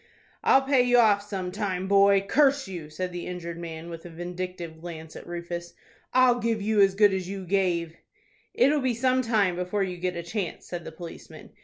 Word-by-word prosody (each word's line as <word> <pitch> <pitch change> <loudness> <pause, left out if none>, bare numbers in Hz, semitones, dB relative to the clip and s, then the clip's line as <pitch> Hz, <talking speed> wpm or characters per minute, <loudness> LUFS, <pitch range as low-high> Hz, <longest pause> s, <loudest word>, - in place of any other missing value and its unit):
"I'll 270 - +5
pay 270 -1 +3
you 245 0 +4
off 210 -4 +5
some 195 -3 -5
time, 190 -2 -2
boy, 200 0 +5
curse 280 +2 +3
you!" 170 -5 -7
said 180 +4 -4
the 175 0 -6
injured 170 -2 -6
man, 165 -1 -7
with 165 -1 -8
a 175 - -9
vindictive 175 -1 -6
glance 160 -2 -8
at - - -10
Rufus. 170 0 -6 0.4
"I'll 250 -1 +4
give 230 -1 0
you 210 0 +2
as 195 -1 +4
good 205 -1 +5
as 185 -1 -3
you 195 -1 -5
gave." 175 -3 0 0.6
"It'll 285 +3 +4
be 255 -2 0
some 255 +2 +2
time 215 -7 +1
before 180 +3 -1
you 180 -2 -4
get 180 0 -2
a 170 - -4
chance," 185 0 -4
said 175 -1 -6
the - - -7
policeman. 165 +1 -11
185 Hz, 200 wpm, -26 LUFS, 175-215 Hz, 0.6 s, I'll